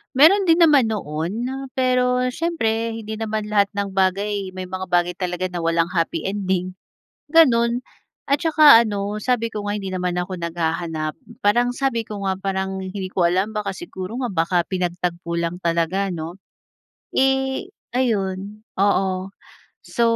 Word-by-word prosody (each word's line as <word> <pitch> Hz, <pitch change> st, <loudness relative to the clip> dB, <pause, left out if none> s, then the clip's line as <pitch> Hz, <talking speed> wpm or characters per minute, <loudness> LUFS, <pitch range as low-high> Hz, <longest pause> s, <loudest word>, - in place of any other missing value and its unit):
Meron 330 Hz, +9 st, +7 dB
din 335 Hz, -2 st, +4 dB
naman 290 Hz, -9 st, +5 dB
noon 185 Hz, +4 st, -3 dB
na, 265 Hz, 0 st, -6 dB
pero 250 Hz, -1 st, +2 dB
siyempre 230 Hz, -9 st, 0 dB
hindi 220 Hz, -1 st, -5 dB
naman 215 Hz, -1 st, -3 dB
lahat 205 Hz, -1 st, +2 dB
ng 200 Hz, -1 st, -3 dB
bagay, 195 Hz, +1 st, 0 dB
may 185 Hz, 0 st, -6 dB
mga 185 Hz, 0 st, -6 dB
bagay 175 Hz, 0 st, +2 dB
talaga 180 Hz, 0 st, -2 dB
na 175 Hz, -2 st, -5 dB
walang 165 Hz, 0 st, +2 dB
happy 165 Hz, -2 st, -1 dB
ending, 185 Hz, -2 st, -2 dB, 0.6 s
ganoon. 240 Hz, -7 st, +5 dB, 0.5 s
At 280 Hz, +3 st, +1 dB
saka, 305 Hz, -7 st, +8 dB
ano 205 Hz, -1 st, -3 dB
sabi 230 Hz, -2 st, 0 dB
ko 210 Hz, -, -3 dB
nga 210 Hz, -, -1 dB
hindi 195 Hz, -, -6 dB
naman 180 Hz, -1 st, -1 dB
ako 180 Hz, +1 st, -3 dB
naghahanap. 165 Hz, -2 st, -2 dB, 0.3 s
Parang 240 Hz, +4 st, +4 dB
sabi 245 Hz, -2 st, -1 dB
ko 205 Hz, -2 st, -6 dB
nga, 190 Hz, -, +1 dB
parang 190 Hz, 0 st, -3 dB
hindi 190 Hz, 0 st, -5 dB
ko 185 Hz, -1 st, -1 dB
alam 185 Hz, +5 st, +1 dB
baka 210 Hz, -2 st, -2 dB
siguro 190 Hz, -, -6 dB
nga 260 Hz, -, -1 dB
baka 170 Hz, +2 st, +1 dB
pinagtagpo 175 Hz, -2 st, -2 dB
lang 170 Hz, +2 st, -3 dB
talaga 170 Hz, +4 st, 0 dB
'no. 165 Hz, -1 st, -5 dB, 0.8 s
Eh, 265 Hz, +5 st, +1 dB, 0.2 s
ayun, 210 Hz, -4 st, -1 dB, 0.2 s
oo. 190 Hz, -1 st, +1 dB, 0.5 s
So, 240 Hz, -, -3 dB
200 Hz, 150 wpm, -22 LUFS, 180-235 Hz, 0.8 s, saka